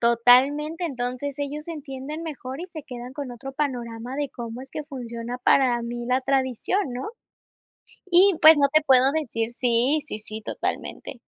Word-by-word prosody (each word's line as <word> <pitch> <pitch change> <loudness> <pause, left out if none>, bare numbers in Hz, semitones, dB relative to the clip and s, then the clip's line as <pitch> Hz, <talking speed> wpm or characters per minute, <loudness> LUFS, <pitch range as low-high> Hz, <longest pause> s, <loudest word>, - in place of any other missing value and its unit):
totalmente. 265 +8 +4
Entonces, 260 0 -4
ellos 295 +3 -4
entienden 295 0 -6
mejor 275 -3 -6
y 360 - -5
se 320 -4 -9
quedan 245 0 -8
con 280 -3 -6
otro 270 +3 -8
panorama 245 -3 -4
de 290 -2 -2
cómo 235 +1 -7
es 270 - -13
que 305 - -5
funciona 245 -3 -6
para 250 -3 +4
mí 240 0 -5
la 255 +1 +2
tradición, 270 - 0
¿no? 255 - -5 1.0
Y, 370 +2 +6
pues, 315 -1 +9
no 280 - +5
te 310 0 +5
puedo 265 -1 +6
decir 235 -7 -2
sí, 245 +4 +2
sí, 215 - -6
sí, 215 0 -8
totalmente. - - -5
265 Hz, 165 wpm, -24 LUFS, 240-295 Hz, 1.0 s, pues